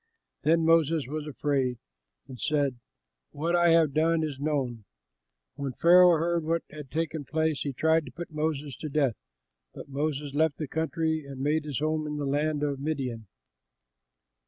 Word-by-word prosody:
Then 165 +1 +3
Moses 165 -2 +3
was 150 +3 -5
afraid 135 -4 -1 0.5
and 130 -3 -10
said, 140 -5 0 0.5
"What 165 +4 -1
I 175 0 +4
have 165 -4 +4
done 160 +1 +2
is 145 -4 -4
known!" 135 -7 -2 0.7
When 140 -2 -4
Pharaoh 175 +3 +6
heard 170 +1 0
what 165 +1 0
had 150 -3 -9
taken 155 0 -2
place, 160 +1 -1
he 140 - -2
tried 160 +3 +2
to - - -8
put 170 -1 -8
Moses 150 -3 -2
to 155 - -5
death; 140 -5 +1 0.6
but - - -9
Moses 145 0 -2
left 155 0 +2
the 155 - -4
country 160 +1 -1
and 135 -1 -8
made 150 +3 0
his 145 -4 -3
home 155 +1 -1
in 150 0 -4
the 145 - -2
land 150 +2 0
of 140 -2 -1
Midian. 130 -7 -3
150 Hz, 165 wpm, -28 LUFS, 140-160 Hz, 0.7 s, Pharaoh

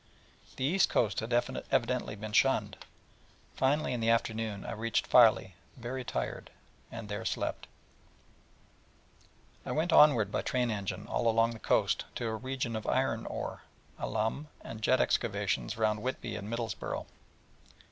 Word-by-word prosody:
The - - -4
east 185 +7 +3
coast 110 -4 +1
had 110 +2 -5
evidently 120 -1 0
been 105 0 -7
shunned. 105 -4 +3 0.8
Finally, 135 +1 +1
in 125 - -2
the 115 0 +1
afternoon 110 -3 0
I - - -4
reached 115 0 -1
Filey, 110 -6 +5 0.2
very 125 +2 -4
tired, 60 - -4 0.4
and 115 -2 -7
there 105 0 -4
slept. - - -2 2.0
I - - -5
went 160 +4 0
onward 120 -9 +6
by - - 0
train 125 -2 0
engine 100 -3 -4
all 120 - -1
along 115 +1 +3
the 115 - -8
coast - - +1
to 120 - -3
a 110 -1 -1
region 130 0 -3
of 110 - -4
iron - - 0
ore, - - -5 0.4
alum, 110 +8 -2
and 110 -1 -8
jet 130 +3 +3
excavations 100 0 0
round 105 -1 +1
Whitby 125 -2 -3
and 105 0 -6
Middlesborough. 115 -2 -3
115 Hz, 145 wpm, -31 LUFS, 105-125 Hz, 2.0 s, onward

